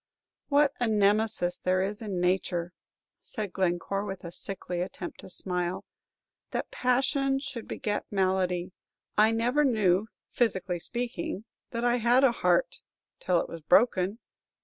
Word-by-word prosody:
"What 285 -1 +4
a 245 - +1
Nemesis 205 -4 +2
there 185 +1 +1
is 205 +3 -3
in 200 -5 -3
nature," 180 -1 0 0.5
said 210 -4 -5
Glencore, 190 +1 0
with 195 -2 -6
a 170 - -6
sickly 180 -1 -4
attempt 180 -1 -6
to - - -9
smile, 180 -1 -2 0.6
"that - - -3
passion 270 +2 +1
should 270 -4 -6
beget 210 -1 -2
malady! 185 -2 0 0.4
I 215 +1 +6
never 245 +6 +2
knew, 210 -6 +3 0.2
physically 190 -6 0
speaking, 230 -2 -4 0.2
that 235 0 -3
I 240 0 +3
had 245 +3 +4
a 270 - +6
heart - - +1 0.4
till 180 -2 +2
it - - -5
was 165 - -8
broken. 190 +3 +3
200 Hz, 140 wpm, -28 LUFS, 180-240 Hz, 0.6 s, I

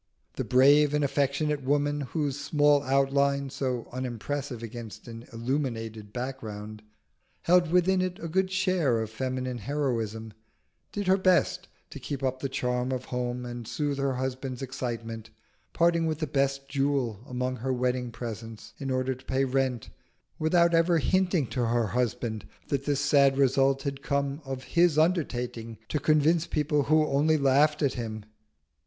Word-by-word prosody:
The - - -3
brave 145 +3 +5
and 150 - +1
affectionate 145 +1 0
woman 145 +2 +1
whose 145 0 -2
small 145 0 +3
outline, 140 0 +1
so 130 -4 -2
unimpressive 125 0 -4
against 115 0 -8
an 115 0 -9
illuminated 115 -4 -3
background, 110 -4 -6 0.6
held 175 -1 +4
within 180 +1 +3
it 185 -1 -2
a 165 - -6
good 185 +3 +1
share 185 - +1
of 110 -1 -4
feminine 130 +1 -3
heroism, 115 -4 -2 0.6
did 205 -1 -3
her 190 +1 +4
best 185 -2 +2 0.2
to - - -8
keep 140 -2 -5
up 130 -1 -1
the 135 - -3
charm 125 -1 -1
of 130 -1 -3
home 125 0 -2
and 120 -2 -7
soothe 145 -2 -2
her 135 -1 0
husband's 130 0 -4
excitement; 115 -4 -5 0.4
parting 170 -1 +2
with 155 -2 -1
the 155 - -2
best 135 -1 0
jewel 135 -6 0
among 125 0 -2
her 130 +3 -2
wedding 125 0 0
presents 115 -1 -7
in 135 -2 -4
order 130 0 0
to 130 +1 -15
pay 135 +1 +1
rent, 130 -3 -1 0.5
without 170 +2 +3
ever 165 +1 +4
hinting 180 -1 +2
to 120 0 -1
her 120 0 +1
husband 120 -1 -2 0.2
that 140 -1 -1
this 145 -1 0
sad 140 -2 +4
result 135 0 +3
had 140 -1 -4
come 140 +1 -1
of 135 -1 -5
his 170 -1 +3
undertaking 125 -9 0
to 150 - 0
convince 155 +3 +3
people 150 -1 +1
who 155 +1 +4
only 150 +2 +2
laughed 145 +2 +3
at 140 - +2
him. 110 -3 -5
135 Hz, 155 wpm, -28 LUFS, 125-150 Hz, 0.6 s, brave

